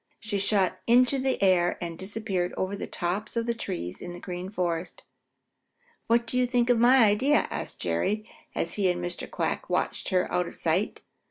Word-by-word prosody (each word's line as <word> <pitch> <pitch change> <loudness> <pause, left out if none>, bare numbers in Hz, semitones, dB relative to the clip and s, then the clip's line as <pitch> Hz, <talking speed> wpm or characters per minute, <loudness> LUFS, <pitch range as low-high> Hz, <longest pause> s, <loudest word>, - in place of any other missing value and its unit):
She 210 -2 -2
shot 195 -2 +3
up - - -22
into 250 +3 +4
the 260 0 0
air 180 -2 +3
and 170 -2 -4
disappeared 190 -1 -3
over 190 +2 -1
the - - -5
tops 200 +6 -3
of 230 - 0
the 235 - 0
trees 180 - -5
in 175 - -6
the 175 - -8
Green 180 0 -6
Forest. 175 -3 -3 1.0
"What 235 +1 +3
do 250 +2 0
you 250 - +3
think 245 0 +2
of 235 - +3
my 245 0 +7
idea?" 255 +9 +3
asked - - -5
Jerry, 90 - -1 0.3
as 170 - -1
he 195 -3 +2
and 175 0 0
Mr. 175 0 -4
Quack - - -2
watched - - -1
her 185 -1 +2
out 180 -1 +1
of - - -8
sight. 175 +6 0
200 Hz, 195 wpm, -27 LUFS, 175-235 Hz, 1.0 s, my